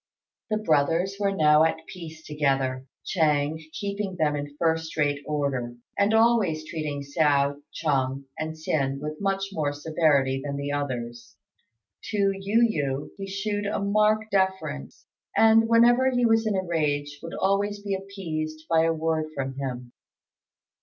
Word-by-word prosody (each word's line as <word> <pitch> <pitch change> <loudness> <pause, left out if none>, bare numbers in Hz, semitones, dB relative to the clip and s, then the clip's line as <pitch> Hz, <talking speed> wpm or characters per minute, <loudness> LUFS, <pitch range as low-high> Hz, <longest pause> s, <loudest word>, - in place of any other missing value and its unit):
The 215 - +1
brothers 170 +1 +1
were 200 -1 +1
now 155 -4 +5
at 160 0 0
peace 160 -3 -10
together, 135 -3 0 0.2
Ch'êng 155 -2 +1
keeping 200 -1 -3
them 155 -3 +1
in 145 0 -6
first 160 -1 0
rate 145 -1 +1
order, 140 -5 -2 0.2
and 200 +1 +2
always 220 -9 +3
treating 150 -3 -4
Hsiao, 140 -1 +1
Chung, 135 -3 -1
and 155 0 -4
Hsin 140 -4 -1
with 150 +3 -6
much 195 0 0
more 155 -6 -1
severity 145 -3 +1
than 140 -1 -3
the 140 0 -3
others. 120 -5 -4 0.7
To 200 -2 +1
Yu 205 +5 +2
yü 140 -8 -2
he 195 -1 -6
shewed 205 +1 -2
a 205 - -1
marked 215 +2 +2
deference, 190 - -1 0.3
and, 225 0 +5
whenever 240 +3 +5
he 245 -2 +1
was 225 -1 +3
in 210 - +1
a 190 - 0
rage, 145 -4 -1
would 165 - -7
always 205 +1 0
be 200 -1 -2
appeased 160 -6 -5
by 165 -1 +4
a 165 - +2
word 160 -1 -1
from 135 -1 -3
him. 125 -3 -5
160 Hz, 150 wpm, -26 LUFS, 145-195 Hz, 0.7 s, now